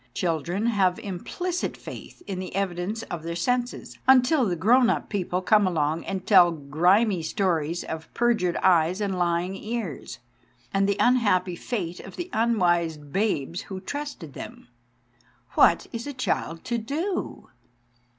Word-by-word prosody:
Children 175 +4 -1
have 195 -6 +2
implicit 345 - -4
faith - - -10
in 190 -2 -4
the 185 - -6
evidence 195 +3 -2
of 175 - -6
their 170 +1 -4
senses 245 +7 -2
until 265 +1 +5
the 180 - 0
grown 240 +8 +4
up - - -1
people 185 -2 -2
come 210 0 +4
along 160 -2 0
and 190 -1 -4
tell 185 -4 +7
grimy 175 +7 +2
stories 165 -1 -1
of 160 0 -7
perjured 225 -8 +2
eyes 175 +1 +4
and 200 -2 -1
lying 175 +1 0
ears, 215 - -5 0.6
and 195 0 +2
the 200 - +1
unhappy 205 -8 +3
fate 180 -4 -4
of 190 - -10
the 355 0 -6
unwise 175 -8 +2
babes 150 +1 -2
who 190 -1 -5
trusted 205 - -6
them. - - -9 0.8
What - - +4
is 235 +3 -5
a 285 - -4
child 165 -9 -2
to 235 -1 -1
do? 315 - -3
190 Hz, 145 wpm, -25 LUFS, 170-230 Hz, 0.8 s, tell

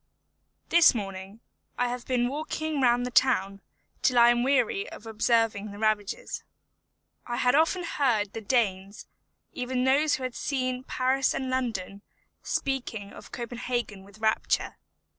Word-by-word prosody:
This 340 -5 +6
morning 195 0 -6 0.4
I 245 - +1
have 245 0 -5
been 245 -2 +1
walking 310 +1 -3
round 245 -1 +3
the 250 - -4
town, 200 -7 +2 0.4
till 255 - +2
I 235 0 +8
am 240 0 +1
weary 395 - +1
of 215 - -11
observing 225 -1 +1
the 200 - -9
ravages. 215 - -1 0.8
I 240 - -3
had 250 0 +3
often 325 +5 +2
heard 235 -11 0
the 225 - -5
Danes, 200 -4 -1 0.5
even 250 0 -2
those 285 +3 +3
who 265 - -7
had 255 -1 -3
seen 255 -2 -2
Paris 260 +1 +1
and 260 -1 -3
London, 205 -7 -3 0.4
speak 270 -4 -2
of 200 -2 -9
Copenhagen 240 -4 -4
with 200 +1 -16
rapture. 220 0 0
245 Hz, 140 wpm, -27 LUFS, 215-265 Hz, 0.8 s, I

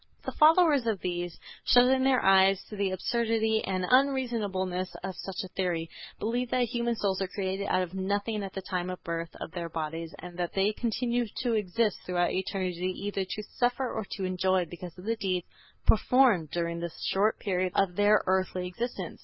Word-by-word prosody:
The - - -2
followers 305 -5 +5
of 215 -4 0
these, 175 -1 -3 0.2
shutting 255 +2 +5
their 265 -1 +3
eyes 195 0 +5
to - - -5
the 200 -1 0
absurdity 220 +3 0
and 185 -1 -1
unreasonableness 215 -9 +1
of 190 -1 -4
such 195 +3 -5
a - - -6
theory, 170 -3 -2 0.3
believe 240 +3 -1
that 250 0 +2
human 235 -1 0
souls 195 -3 -1
are 190 - 0
created 195 0 -3
out 185 -1 +2
of 180 0 -7
nothing 200 +3 -1
at 195 -1 -6
the 195 - -5
time 180 -2 -2
of 185 - -4
the - - -42
birth 165 0 -3
of - - -6
their 170 -1 -4
bodies 165 +1 -4
and 175 +1 -9
that 175 -1 -2
they 200 +2 +2
continue 240 +1 -1 0.2
to 240 -2 +1
exist 215 +1 +1
throughout 175 -1 0
eternity 185 -1 -2
either 200 -1 -2
to 210 +3 -5
suffer 245 +4 -1
or - - -2
to 195 - -3
enjoy 185 0 +1
because 175 +1 -9
of 180 - -11
the 230 +1 0
deeds 185 -4 -1 0.4
performed 225 - +4
during 170 0 -2
the 170 0 -3 0.2
short 205 +3 +2
period 185 -2 -1
of 185 -3 +2
their 205 +1 +4
earthly 185 -1 0
existence. 230 +7 -5
195 Hz, 190 wpm, -29 LUFS, 180-230 Hz, 0.4 s, followers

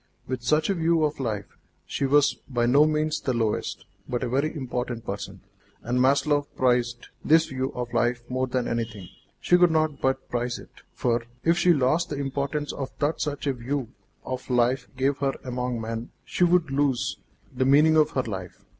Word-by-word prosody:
With 130 -1 -3
such 155 +5 +2
a 200 - +2
view 165 -2 +2
of 150 -1 0
life, 110 -6 -4 0.3
she 140 - -1
was 145 +1 +4 0.2
by 120 -3 +1
no 140 +5 +5
means 155 0 0
the 130 - -1
lowest, 110 -2 -1 0.2
but 125 +1 -1
a 125 - -1
very 140 +5 +1
important 125 -4 -4
person. 100 0 -6 0.4
And 125 +2 0
Maslova 145 +2 +3
prized 120 -1 +1
this 160 +1 +5
view 130 0 -3
of 125 -1 -4
life 120 0 +1
more 130 0 -1
than 125 -1 -1
anything; 115 -5 -3 0.3
she 180 - +4
could 175 -1 +6
not 155 -3 0
but 130 0 0
prize 120 0 -2
it, - - -13 0.2
for, 120 -1 0 0.2
if 165 +1 +4
she 180 - +5
lost 150 +2 +2
the 145 - -3
importance 140 +2 -2 0.3
that 150 +2 0
such 145 -1 -3
a 140 - +1
view 130 0 -3 0.4
of 130 0 -5
life 125 +1 +2
gave 135 +1 +1
her 135 -1 0
among 125 -1 -2
men, 115 +1 -4 0.2
she - - 0
would 175 -4 +2
lose 135 -3 0 0.4
the 130 - +1
meaning 150 +4 +5
of 155 -1 +5
her 130 - +2
life. 95 -6 -7
130 Hz, 185 wpm, -26 LUFS, 120-150 Hz, 0.4 s, could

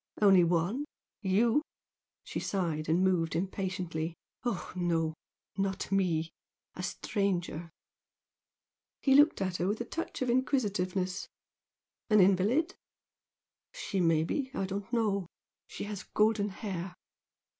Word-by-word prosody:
"Only 195 -4 +7
one? 175 - +1 0.4
You?" 225 +7 +3 0.6
She - - -4
sighed, 165 -6 -1
and 170 +4 +3
moved 170 -4 +2
impatiently. 180 -3 -2 0.3
"Oh, 240 -7 -3
no! 165 -3 +1 0.5
Not 195 0 -1
me. 170 -4 +1 0.4
A - - -6
stranger." 175 -5 -2 1.3
He 270 - +3
looked 290 -6 +6
at 185 -1 -1
her 175 - 0
with 210 +2 0
a 240 - -3
touch 330 -1 -4
of 255 - -1
inquisitiveness. 195 -8 0 0.8
"An 215 -1 +6
invalid?" 200 - +4 1.0
"She 225 - -3
may 165 -3 +3
be. 265 - -2
I 195 - 0
don't 195 +2 -5
know. 205 -6 +1 0.4
She - - -6
has 205 -1 -5
golden 210 -1 +2
hair." 190 -3 -5
190 Hz, 120 wpm, -31 LUFS, 175-215 Hz, 1.3 s, Only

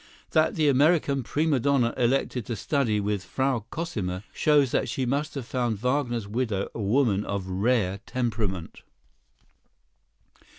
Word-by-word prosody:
That 155 0 +3
the 155 -2 +2
American 140 0 +3
prima 145 +3 +1
donna 130 -3 +2
elected 125 -1 0
to 115 - -2
study 115 -1 0
with 100 -1 -1
Frau 130 +3 -1
Cosima 100 - -3
shows 145 -4 +3
that - - 0
she 130 - -1
must 145 +5 -1
have 135 -4 -4
found 120 -3 -1
Wagner's 120 -2 -1
widow 110 -3 -1
a 115 - -5
woman 105 -1 +2
of 100 -2 -3
rare 100 0 0
temperament. 110 -8 -3
120 Hz, 135 wpm, -26 LUFS, 105-140 Hz, -, That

